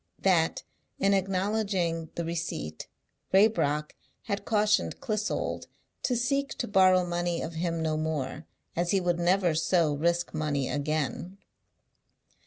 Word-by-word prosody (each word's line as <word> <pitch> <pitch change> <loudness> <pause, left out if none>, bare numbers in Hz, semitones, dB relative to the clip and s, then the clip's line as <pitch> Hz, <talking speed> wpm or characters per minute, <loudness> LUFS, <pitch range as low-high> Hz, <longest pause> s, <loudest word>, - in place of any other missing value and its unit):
That, 170 -4 +2 0.3
in 195 - +2
acknowlodging 190 -4 0
the 170 - -2
receipt, 160 - -4 0.4
Raybrock 150 -7 +3 0.3
had 200 -2 -3
cautioned 215 -1 +2
Clissold 215 -5 -2 0.3
to 250 - 0
seek 275 +4 0
to 240 - -3
borrow 185 -3 +5
money 175 0 -1
of 165 - -5
him 165 0 -2
no 155 -1 0
more, 155 -1 -3 0.3
as 175 +1 0
he 195 - +3
would 175 -1 0
never 175 0 +3
so 160 -1 +2
risk 170 +4 0
money 150 -4 -1
again. 155 +5 -2
175 Hz, 125 wpm, -28 LUFS, 160-195 Hz, 0.4 s, borrow